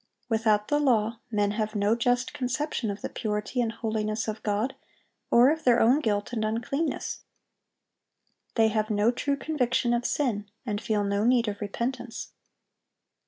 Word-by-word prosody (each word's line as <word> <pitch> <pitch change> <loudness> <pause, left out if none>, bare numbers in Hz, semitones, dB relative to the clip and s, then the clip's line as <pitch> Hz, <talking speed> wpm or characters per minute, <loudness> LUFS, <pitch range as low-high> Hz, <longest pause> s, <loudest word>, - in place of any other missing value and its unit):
(793) 225 -2 +2
Without 210 -2 +2
the 295 - +2
law, 230 -4 +2
men 205 -2 +1
have 215 0 -2
no 205 +2 +2
just 245 +1 +1
conception 255 -2 -2
of 200 0 -4
the - - -2
purity 210 +3 -2
and 230 -2 0
holiness 215 -1 -2
of 215 0 -4
God, 215 +5 0 0.6
or 245 +4 +6
of 320 0 -2
their 240 -1 +5
own 250 +6 +5
guilt 205 -4 -1
and 220 -2 -1
uncleanness. 235 +8 -2 1.3
They 225 -1 +4
have 215 0 0
no 210 +2 +3
true 280 +3 -1
conviction 250 -5 0
of 240 +1 +1
sin, 210 -8 -1 0.2
and 210 -2 -2
feel 210 0 0
no 200 +1 0
need 240 0 +3
of 205 0 -4
repentance. 235 +3 -4
225 Hz, 165 wpm, -27 LUFS, 210-245 Hz, 1.3 s, or